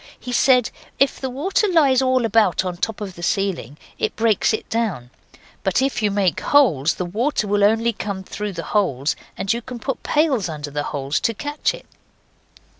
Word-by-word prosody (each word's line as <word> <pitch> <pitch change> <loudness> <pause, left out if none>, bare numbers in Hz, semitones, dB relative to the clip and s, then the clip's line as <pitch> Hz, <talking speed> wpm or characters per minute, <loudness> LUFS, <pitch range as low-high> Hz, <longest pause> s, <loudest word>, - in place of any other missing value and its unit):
He 250 - -7
said 250 -1 +4 0.3
if 275 - +2
the 265 - -2
water 355 - 0
lies 285 -8 +4
all 255 -2 +2
about 215 -4 +2
on 180 - -2
the 175 - -16
top 225 -1 -2
of 195 -3 -5
the 175 - -11
ceiling, 180 -5 -1 0.2
it - - -1
breaks 220 -2 +2
it 220 - -3
down, 190 - -2 0.5
but 195 +3 +1
if 270 -2 0
you 210 - +2
make 195 -3 +1
holes 170 - +3
the 180 - -3
water 220 +7 -1
will 205 0 +2
only 225 +3 +3
come 200 -2 -5
through 210 +1 -5
the 165 -1 -5
holes 150 -9 +1 0.2
and 195 +3 0
you 235 - -3
can 250 +1 -8
put 235 +4 -4
pails 280 - +1
under 150 -2 -6
the 145 0 -2
holes 140 +1 -1
to 230 - -1
catch 290 +6 -2
it. - - -14
215 Hz, 195 wpm, -21 LUFS, 180-255 Hz, 0.5 s, said